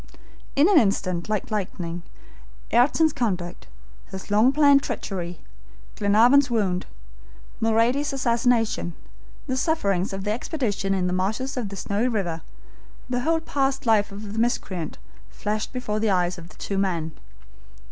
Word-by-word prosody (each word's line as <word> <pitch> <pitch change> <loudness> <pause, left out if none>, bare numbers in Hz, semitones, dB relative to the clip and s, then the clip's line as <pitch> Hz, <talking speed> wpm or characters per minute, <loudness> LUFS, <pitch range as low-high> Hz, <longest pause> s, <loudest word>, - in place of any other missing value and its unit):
In 285 +4 +5
an 390 -5 +7
instant, 190 -4 0
like 215 -1 -2
lightning, 180 -4 -3 0.7
Ayrton's 290 +6 +4
conduct, 185 -7 -2 0.4
his 190 +1 -8
long 215 +5 +5
planned 285 -1 +5
treachery, 175 -8 -5 0.5
Glenarvan's 235 +7 +5
wound, 195 -6 0 0.7
Mulrady's 230 +6 +2
assassination, 235 -7 +1 0.5
the 260 - -1
sufferings 200 - 0
of 195 0 -4
the 210 - -1
expedition 215 -6 -1
in 185 -1 0
the 180 - 0
marshes 215 +9 -1
of 240 -6 -3
the 200 - -7
Snowy 205 +5 -1
River, 185 -9 -2 0.7
the 245 - +1
whole 325 +5 +1
past 275 -3 -1
life 215 -2 +3
of 205 +1 -7
the 225 - -2
miscreant, 190 - -1 0.3
flashed 210 +1 -3
before 215 -5 -2
the 220 0 +1
eyes 180 -1 +1
of 170 0 -12
the - - -17
two 195 -1 -2
men. 170 -5 -1
215 Hz, 140 wpm, -24 LUFS, 190-250 Hz, 0.7 s, an